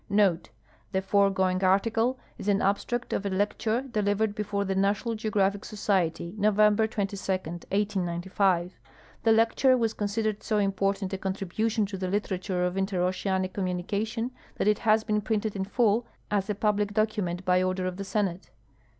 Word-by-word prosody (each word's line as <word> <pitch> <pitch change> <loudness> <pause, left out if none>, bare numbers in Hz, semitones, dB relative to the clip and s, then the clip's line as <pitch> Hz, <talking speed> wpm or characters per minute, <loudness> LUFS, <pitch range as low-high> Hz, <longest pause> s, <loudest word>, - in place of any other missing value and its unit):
[Note.— 195 -4 +2 0.4
The 190 - +1
foregoing 190 -2 +2
ariicle 225 +6 +2 0.2
is - - -6
an 200 -1 +3
abstract 220 +6 -1
of - - -1
a 200 - -1
lecture 210 +5 0
delivered 210 -4 0
before 205 -1 -2
the 195 - -1
National 200 +4 +1
Geographic 205 -2 0
Society, 175 -5 -1
November 210 +1 +4
22, 200 -3 -3 0.5
189.>. 185 -2 0 0.5
The 225 - +3
lecture 230 +4 +4
was 225 -2 0
considered 210 0 -1
so 215 - 0
important 195 -1 0
a 195 - -2
contribution 200 +3 -1
to 195 -1 -6
the 185 - -2
literature 185 -2 -1
of 180 +1 -2
interoceanic 190 0 0
communication 205 +5 -2 0.2
that - - -1
it 210 -1 +3
has 220 -1 +3
been 210 -1 0
printed 215 -1 -1
in 190 -1 -2
full 225 +2 +2 0.2
as 200 -1 0
a 210 - 0
public 205 0 0
document 205 -5 0
by 180 0 +3
order 185 0 -1
of 185 0 -3
the 200 - -4
Senate. 195 -3 -2
200 Hz, 155 wpm, -27 LUFS, 190-215 Hz, 0.5 s, November